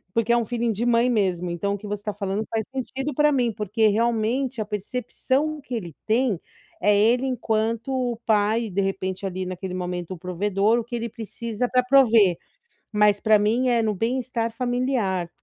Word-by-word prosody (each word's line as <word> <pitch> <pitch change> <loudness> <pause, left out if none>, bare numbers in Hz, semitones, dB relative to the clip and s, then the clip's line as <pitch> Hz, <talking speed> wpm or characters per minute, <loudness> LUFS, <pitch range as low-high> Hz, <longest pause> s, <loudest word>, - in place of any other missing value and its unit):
porque 230 +1 +2
é - - +4
um 235 - 0
feeling 235 -1 0
de 220 +3 -2
mãe, 240 +1 +3
mesmo. 180 -5 0
Então 200 +4 -1
o - - -2
que 210 - -12
você 205 0 -4
tá 210 - -3
falando 200 +1 -2
faz 220 -1 -1
sentido 270 +2 -3
pra 300 +2 +3
mim, 250 -4 +1
porque, 215 +1 0
realmente, 235 +4 0
a 215 - -1
percepção 255 +8 -2
que 255 -3 -6
ele 175 -9 -6
tem, 225 -4 +2 0.4
é 205 +2 +4
ele 240 +5 +3
enquanto 230 -1 -1
o 245 -3 -1
pai, 220 +1 +2
de 195 +2 0
repente, 195 0 -2
ali, 185 0 -4
naquele 185 0 -5
momento, 180 -1 -4
o - - -12
provedor 200 +5 +1
o - - -3
que 240 +2 -6
ele 235 0 -2
precisa 230 +1 -4
pra 250 0 +3
prover. 230 -8 +5 0.6
Mas, 210 -1 +3
pra 215 -2 +5
mim 225 +5 +1
é 235 -2 +3
no 215 -1 0
bem 230 +6 0
estar 235 -2 -2
familiar. 245 -7 -1
220 Hz, 195 wpm, -24 LUFS, 200-245 Hz, 0.6 s, prover